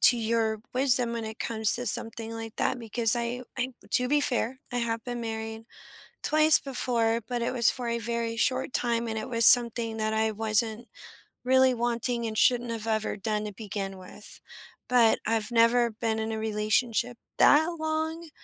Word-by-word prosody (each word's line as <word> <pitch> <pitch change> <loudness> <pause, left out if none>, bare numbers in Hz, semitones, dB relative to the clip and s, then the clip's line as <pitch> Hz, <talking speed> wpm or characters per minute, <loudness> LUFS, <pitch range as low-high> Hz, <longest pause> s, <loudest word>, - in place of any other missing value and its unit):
to 245 - +5
your 225 -1 -1 0.2
wisdom 250 -2 +2
when 230 -1 -4
it 220 0 -8
comes 220 -2 +3
to 245 - -1
something 225 +1 -3
like 225 -1 -8
that 255 - -1
because 230 0 +2
I 240 +1 -3 0.2
I 250 +1 -1 0.2
to 250 0 +2
be 295 +2 +2
fair, 255 0 -1
I 245 - -1
have 230 -1 -3
been 245 -1 -5
married 225 0 -6 0.6
twice 310 0 +5
before, 235 -4 -1
but 240 -1 -3
it - - -1
was 240 -3 +2
for 250 -2 -6
a 235 0 -1
very 230 0 -3
short 255 +2 0
time, 235 -1 -1
and 220 -1 -4
it 215 - -6
was 230 -2 +2
something 230 -2 +5
that 215 0 -1
I 220 0 0
wasn't 220 +2 -1 0.6
really 260 0 +4
wanting 235 0 -1
and 215 -1 -4
shouldn't 245 -2 +2
have 225 -1 -5
ever 220 -1 -1
done 210 +1 -2
to 210 - -6
begin 195 -2 -6
with, 185 +3 -12 0.5
but 240 -3 +4
I've 225 0 -1
never 235 +1 +3
been 220 0 -3
in 220 - -3
a 220 - -3
relationship 220 +3 -1 0.2
that 315 +3 +5
long, 315 +1 -3
230 Hz, 180 wpm, -27 LUFS, 220-245 Hz, 0.6 s, to